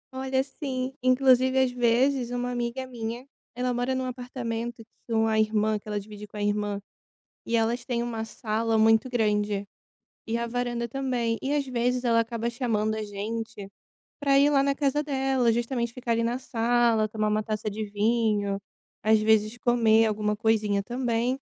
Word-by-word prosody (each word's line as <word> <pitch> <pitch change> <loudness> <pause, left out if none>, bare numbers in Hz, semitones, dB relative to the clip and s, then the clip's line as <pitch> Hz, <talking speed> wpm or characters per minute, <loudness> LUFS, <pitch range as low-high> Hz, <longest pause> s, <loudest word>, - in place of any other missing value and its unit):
Olha, 265 0 0
sim, 265 -2 -4
inclusive, 255 0 +4
às 255 - 0
vezes, 245 +1 +2
uma 245 0 -2
amiga 245 +2 -3
minha, 240 0 -6 0.3
ela 250 0 -1
mora 245 +2 -1
num 260 0 -1
apartamento 240 -2 -5 0.2
que - - -9
uma 220 -1 +2
irmã 215 0 +1
que 205 - -20
ela 210 -1 -2
divide 210 +1 -10
com 210 - -11
a 205 - -2
irmã, 205 0 0 0.7
e 235 - 0
elas 230 +2 0
têm 240 -2 -1
uma 225 -2 -3
sala 225 0 -1
muito 225 +2 +4
grande. 210 -3 0 0.6
E 225 +1 0
a 235 0 -2
varanda 240 0 -2
também. 240 -2 -1
E, 280 +2 -1
às 285 -1 0
vezes, 250 0 0
ela 230 -2 +3
acaba 230 0 -1
chamando 220 -3 -1
a 220 - -3
gente 210 0 -5 0.5
pra 275 -1 +4
ir 285 +1 +5
lá 275 -2 +3
na 280 0 +2
casa 285 +1 0
dela, 265 -4 +1
justamente 235 0 -1
ficar 240 -2 -2
ali 230 0 +1
na 240 +2 -1
sala, 235 -2 +2
tomar 215 0 -1
uma 210 0 +1
taça 215 0 -3
de 215 +1 -4
vinho, 210 -2 +1 0.4
às 220 0 +5
vezes 215 +1 +3
comer 225 -2 +4
alguma 210 0 0
coisinha 210 -2 +1
também. 245 +2 -1
235 Hz, 175 wpm, -27 LUFS, 220-250 Hz, 0.7 s, ir